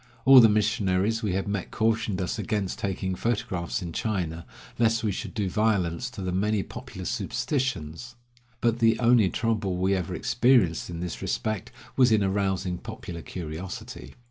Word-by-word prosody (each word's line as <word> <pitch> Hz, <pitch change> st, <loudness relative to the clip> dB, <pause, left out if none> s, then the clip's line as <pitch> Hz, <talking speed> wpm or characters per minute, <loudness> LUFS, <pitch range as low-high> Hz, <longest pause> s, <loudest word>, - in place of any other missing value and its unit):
All 135 Hz, 0 st, +10 dB
the 115 Hz, -2 st, +8 dB
missionaries 105 Hz, 0 st, +1 dB
we 105 Hz, -4 st, -1 dB
had 95 Hz, +1 st, -1 dB
met 100 Hz, -2 st, -3 dB
cautioned 110 Hz, -3 st, 0 dB
us 90 Hz, -, -3 dB
against 105 Hz, -4 st, -2 dB
taking 95 Hz, -1 st, -2 dB
photographs 90 Hz, -4 st, -2 dB
in 85 Hz, -1 st, -6 dB
China, 85 Hz, -6 st, -2 dB, 0.3 s
lest 115 Hz, -1 st, +2 dB
we 105 Hz, -, +1 dB
should 105 Hz, +2 st, -6 dB
do 105 Hz, -4 st, 0 dB
violence 100 Hz, 0 st, 0 dB
to 115 Hz, -6 st, -7 dB
the 90 Hz, -, -2 dB
many 100 Hz, +2 st, +1 dB
popular -, -, -9 dB
superstitions, 120 Hz, -, -2 dB, 0.5 s
but 120 Hz, 0 st, +1 dB
the 115 Hz, -1 st, +3 dB
only 120 Hz, -5 st, +5 dB
trouble 105 Hz, -5 st, -1 dB
we 95 Hz, +2 st, +2 dB
ever 90 Hz, -3 st, -2 dB
experienced 115 Hz, -13 st, +2 dB
in 85 Hz, -1 st, -5 dB
this 90 Hz, -1 st, -5 dB
respect 110 Hz, -3 st, -2 dB, 0.3 s
was 125 Hz, -3 st, +5 dB
in 110 Hz, -2 st, +4 dB
arousing 95 Hz, -2 st, -1 dB
popular 85 Hz, -2 st, -7 dB
curiosity. 90 Hz, +9 st, -7 dB
100 Hz, 160 wpm, -26 LUFS, 90-115 Hz, 0.5 s, All